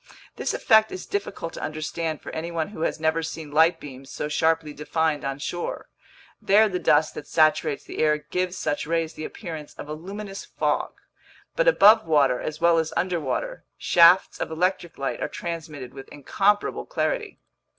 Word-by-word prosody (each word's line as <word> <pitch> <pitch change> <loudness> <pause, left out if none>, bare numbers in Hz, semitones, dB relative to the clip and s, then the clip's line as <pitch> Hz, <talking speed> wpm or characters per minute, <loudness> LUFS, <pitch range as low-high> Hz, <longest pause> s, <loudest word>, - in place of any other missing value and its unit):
This - - -2
effect 220 -2 +4
is 185 - -6
difficult 200 -4 -4
to - - -7
understand 155 +1 -3
for - - -7
anyone 165 +1 -3
who 200 -6 -9
has 165 - -1
never 160 +1 +1
seen 160 -2 -6
light 160 +3 +4
beams 135 -1 -10
so - - -4
sharply 160 0 +1
defined 155 0 -1
on 135 0 -3
shore. 175 +4 -5 0.5
There 210 +3 +5
the 185 -3 -2
dust 150 -1 +3
that - - -8
saturates 155 -2 +2
the - - -8
air 150 -1 +3
gives 180 +4 -3
such 145 - -2
rays 165 -1 -1
the 155 - -6
appearance 160 -6 -8
of - - -9
a 150 - -5
luminous 195 +5 -7
fog; - - -1 0.6
but - - +1
above 220 - +6
water 140 -5 +3
as 155 - -5
well 170 0 +4
as 160 -1 -2
underwater, 180 - -2
shafts 175 +2 +5
of - - -3
electric 175 +1 -1
light 135 - -3
are - - 0
transmitted 155 -7 -6
with 135 0 -10
incomparable 200 +8 0
clarity. - - -2
160 Hz, 170 wpm, -24 LUFS, 150-185 Hz, 0.6 s, above